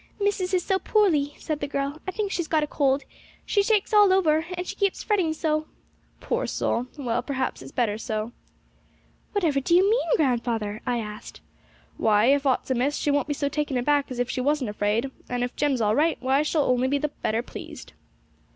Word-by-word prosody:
'Missis 400 -2 0
is 365 -2 +1
so 380 -1 +1
poorly,' 315 -11 +2
said 310 -2 -3
the 285 - -3
girl; 280 +2 -3
'I - - -1
think 410 -1 -2
she's 345 -4 -2
got 310 -1 +2
a - - +1
cold: 275 -2 +1 0.4
she 405 - +2
shakes 420 0 +1
all 415 -2 +7
over, 325 -4 +3
and 360 - -3
she - - -5
keeps 395 -2 0
fretting 380 -7 +1
so.' 310 -1 -1 0.5
'Poor - - -2
soul! 240 +2 -1
well, 245 -5 -1
perhaps 265 -2 -3
it's 135 +1 -10
better 215 -3 0
so.' 220 +1 -3 1.0
'Whatever 330 -9 +1
do 340 +6 +2
you 375 +2 +5
mean, 435 -5 +1
grandfather?' 230 -6 0
I 245 - +1
asked. 210 -2 -7 0.6
'Why, 220 +4 +4
if 285 0 0
aught's 260 0 0
amiss, 260 +4 +1
she 290 - 0
won't 285 -1 +1
be 290 - -1
so 285 - -1
taken 290 -2 -1
aback 285 +3 +1
as 255 - -6
if 245 0 0
she 255 - -2
wasn't 275 -4 0
afraid; 210 +5 0 0.2
and 245 0 -1
if 245 - -4
Jem's 280 -4 +1
all 210 -1 +2
right, 320 +4 +2
why, 265 +3 +2
she'll 305 0 +1
only 255 0 +2
be 285 +2 +1
the 300 +1 -1
better 230 -4 -2
pleased.' - - -10
285 Hz, 205 wpm, -25 LUFS, 245-325 Hz, 1.0 s, all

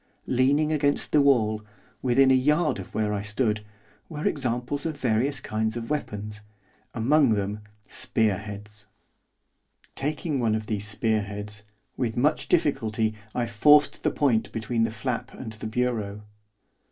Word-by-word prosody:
Leaning 140 +5 +2
against 145 -2 +1
the 150 - +5
wall, 110 -6 +3 0.4
within 130 +1 +4
a - - +6
yard 150 +1 +2
of 95 - -9
where 105 -1 0
I 100 - -1
stood, 105 0 0 0.5
were 150 -2 -2
examples 125 +1 -1
of 160 -3 -3
various 130 +2 +1
kinds 110 -1 -2
of 115 +4 -5
weapons, 105 -7 -4 0.5
among 130 +1 +4
them, 100 +1 -2 0.3
spear 105 -4 0
heads. 105 0 -8 1.1
Taking 150 +1 -2
one 115 -3 +2
of 110 0 -3
these 105 -1 -1
spear 110 +1 +1
heads, 105 +1 -4 0.4
with 120 -3 -2
much 145 +5 +2
difficulty 110 -5 +1 0.2
I 120 - +1
forced 145 +6 +4
the - - +2
point 110 -7 +1
between 115 0 0
the - - -1
flap 120 +2 -4
and 110 -4 -7
the 110 0 -6
bureau. 110 -3 -2
115 Hz, 145 wpm, -26 LUFS, 105-135 Hz, 1.1 s, a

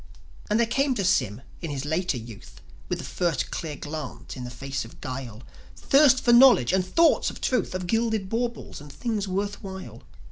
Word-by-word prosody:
And 210 - +2
there 235 - +4
came 270 +3 +1
to 200 - -1
Sym 115 - +1 0.2
in 165 - -4
his 140 -1 -4
later 160 -1 -1
youth, 115 -3 -11 0.3
With - - -1
the - - -7
first 170 -6 -1
clear 155 -3 -4
glance 150 -1 -7
in 125 -2 -6
the - - -6
face 135 +3 -4
of 115 - -14
guile, 125 -3 -6 0.3
Thirst 270 -2 +4
for 240 - +6
knowledge 240 - +7
and 190 -1 +3
thoughts 330 - +3
of - - -9
truth, 250 -7 0
Of 185 -1 -3
gilded 220 0 0
baubles, 235 -5 -3
and 145 -1 -11
things 215 - -3
worth 200 +2 -2
while. 190 - -8
185 Hz, 190 wpm, -26 LUFS, -, 0.3 s, knowledge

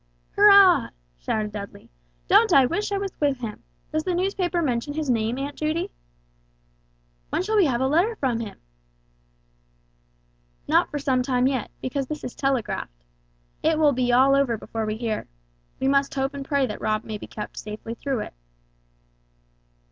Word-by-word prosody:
"Hurrah!" 400 -3 +7 0.3
shouted 210 - -2
Dudley, 200 - -9 0.4
"don't - - +5
I 270 -2 +7
wish 375 +11 -2
I 400 - 0
was 395 -1 -3
with 280 -4 0
him! 220 -3 -6 0.3
Does 310 0 -1
the 365 0 -1
newspaper 360 -2 0
mention 265 +1 -1
his 305 -4 0
name, 225 +1 0
Aunt 280 +1 -4
Judy?" 310 +2 -2 1.4
"When - - -1
shall 435 +3 -1
we 405 -4 +5
have 250 -2 0
a 265 - +2
letter 350 +11 +2
from 255 - -1
him?" 220 -3 -6 2.1
"Not - - +3
for 295 - -4
some 265 -3 +1
time 250 0 +1
yet, 260 -4 0
because 265 +1 -2
this 300 +1 -6
is 250 - -5
telegraphed. 225 - -2 0.6
It 320 0 +2
will 300 -2 +4
be 250 -1 +1
all 260 +3 +5
over 270 -5 +2
before 220 0 -4
we 215 0 -2
hear. 225 -2 -3 0.5
We 265 - 0
must 275 0 +2
hope 270 +1 -1
and 280 -1 -5
pray 280 -1 +1
that 210 - -6
Rob 215 0 0
may 215 -1 -6
be - - -9
kept 210 - -8
safely 215 +2 -7
through 260 -1 -3
it." - - -7
270 Hz, 170 wpm, -24 LUFS, 235-310 Hz, 2.1 s, Hurrah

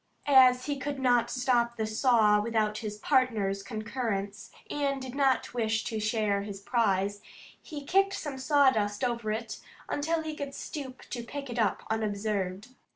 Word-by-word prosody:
As 255 -3 +6
he 285 -2 -2
could 285 +1 -3
not 245 -3 +2
stop 240 -2 +1
the 220 - -1
saw 215 -2 +3
without 215 -1 0
his 210 -2 -5
partners 215 -6 +1
concurrence, 215 -2 -4 0.2
and 280 -2 -1
did 260 -1 -7
not 270 -3 +1
wish 220 -2 0
to 220 - -3
share 215 -2 0
his 200 -1 -6
prize, 205 -2 0 0.4
he 295 -3 -8
kicked 390 +4 +3
some 280 -4 -5
sawdust 260 -8 +2
over 235 -3 -1
it 220 0 -4 0.3
until 320 +2 -1
he 310 -1 -4
could 280 -2 -6
stoop 265 -4 -7
to 240 - -3
pick 275 +2 -7
it 240 - -3
up 210 -4 +1
unobserved. 205 -1 -2
235 Hz, 155 wpm, -29 LUFS, 210-265 Hz, 0.4 s, As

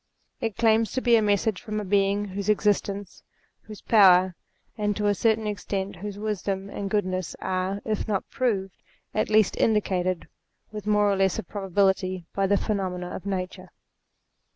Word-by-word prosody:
It 225 -5 -3
claims 225 -1 +3
to 260 - -1
be 240 -2 +4
a 225 - +4
message 205 -1 +1
from 215 -3 -4
a - - -3
Being 200 +1 +2
whose 200 +2 -4
existence, 205 -2 0 0.4
whose 215 -1 -11
power, 185 -4 +6 0.4
and 210 -2 -1
to 210 - -1
a 205 - +4
certain 220 +2 +1
extent 200 -1 -3
whose 205 +2 -6
wisdom 200 -2 -3
and 200 -1 -4
goodness, 185 -3 -1
are, 190 +2 -2
if 215 0 -2
not 200 -3 -1
proved, 195 -7 -2 0.3
at 215 - 0
least 215 -2 +4
indicated 185 -5 +1 0.4
with 210 -1 -7
more 210 -1 +3
or - - +2
less 190 -1 +1
of - - -5
probability 190 -2 0
by 195 0 +1
the 200 +1 +3
phenomena 185 -4 -3
of 195 - -7
Nature. 185 -1 -4
200 Hz, 165 wpm, -26 LUFS, 190-210 Hz, 0.4 s, power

